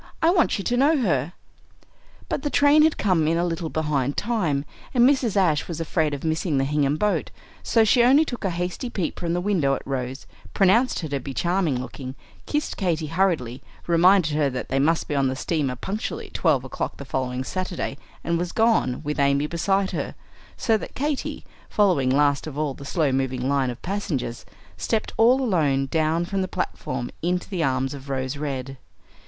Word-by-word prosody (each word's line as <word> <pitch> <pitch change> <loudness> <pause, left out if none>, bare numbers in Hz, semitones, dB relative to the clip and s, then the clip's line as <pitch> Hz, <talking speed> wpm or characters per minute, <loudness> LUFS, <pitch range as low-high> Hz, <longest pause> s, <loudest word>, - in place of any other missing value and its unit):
I 330 - +4
want 350 -3 +2
you 200 - -4
to 245 - 0
know 295 +5 +4
her." 170 - 0 0.9
But - - -2
the 290 - -1
train 290 +2 +5
had 315 0 +3
come 180 -6 +2
in 165 +1 +2
a 170 - +1
little 165 -1 -3
behind 145 -4 -1
time, 170 -12 0 0.3
and 245 0 +6
Mrs. 260 -7 +2
Ashe 165 -6 +2
was 165 -2 -5
afraid 160 -2 0
of 140 - -9
missing 160 -1 0
the 135 - +2
Hingham 145 +1 +1
boat; 210 +4 0 0.3
so 225 - +3
she 220 +3 +4
only 270 +6 +5
took 245 -6 -6
a 195 - +1
hasty 180 +7 -3
peep 185 -8 -3
from 170 -1 -2
the 175 - 0
window 175 -8 +1
at - - -8
Rose, 130 -1 -4 0.3
pronounced 215 +7 +3
her 160 - -4
to 140 -1 -1
be 135 0 -7
charming 175 -7 +1
looking, 130 +1 -7 0.3
kissed 295 0 -2
Katy 170 -5 0
hurriedly, 160 -10 0 0.2
reminded 175 -1 +4
her 145 -2 +2
that 130 -1 -5
they 135 - +1
must 160 +4 +2
be - - -3
on 140 -2 +2
the 130 - -1
steamer 145 -2 -1
punctually 200 - -4
at - - -15
twelve 150 -7 +2
o'clock 130 - -4
the 140 - -8
following 130 -1 -2
Saturday, 185 -1 -3 0.3
and 170 0 0
was 175 0 -2
gone, 220 - +2
with 150 -1 -3
Amy 140 +1 +3
beside 195 +5 0
her; - - -4 0.4
so 225 -1 +2
that - - -9
Katy, 290 0 -3 0.2
following 180 -11 +2
last 145 +2 +2
of 145 -2 -7
all 150 -2 -1
the 140 - -11
slow 150 -1 +1
moving 130 -1 -1
line 135 -2 +1
of 120 +1 -6
passengers, 155 -11 -3 0.3
stepped 215 - -1
all 250 +4 +5
alone 150 - +2
down 160 +2 +1
from 195 +2 -2
the 185 - -1
platform 130 -8 -4
into 180 +2 -1
the 185 -4 -3
arms 130 0 0
of 140 0 -10
Rose 130 0 -2
Red. 135 -2 -4
160 Hz, 195 wpm, -24 LUFS, 135-195 Hz, 0.9 s, and